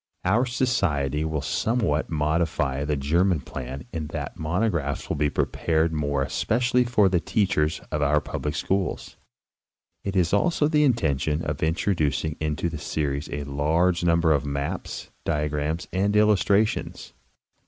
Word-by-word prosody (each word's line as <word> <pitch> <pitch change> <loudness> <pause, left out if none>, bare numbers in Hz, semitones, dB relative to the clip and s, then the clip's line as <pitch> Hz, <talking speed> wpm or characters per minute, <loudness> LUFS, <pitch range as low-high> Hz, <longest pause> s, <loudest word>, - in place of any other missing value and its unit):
* - - -27
Our 120 +4 +3
Society 85 - 0
will 80 -2 -2
somewhat 105 - 0
modify 75 -3 0
the 75 0 0
German 85 +5 +2
plan 65 0 -7
in 80 -3 -3
that 75 -2 -5
the - - -11
monographs 80 -3 -1
will - - 0
be 75 0 +1
prepared 80 +2 0
more 70 -2 0
especially 125 - +1
for 115 -5 +3
the 90 -2 +2
teachers 85 -6 0
of 75 - -1
our 75 +1 +3
public 75 +1 -4
schools. 95 +5 -2 0.9
It 100 -1 -3
is 90 -2 +2
also 150 - +2
the 150 -1 +3
intention 80 - +1
of 75 -1 -3
introducing 80 -2 0
into 75 +2 -1
the 80 -3 -5
series 75 -1 -2
a 75 0 -3
large 80 +6 +1
number 85 -1 +3
of 75 -2 +2
maps, 70 0 -4
diagrams 75 +2 -1
and 100 +2 +1
illustra 105 0 +4
tions. - - -6
80 Hz, 150 wpm, -25 LUFS, 75-95 Hz, 0.9 s, illustra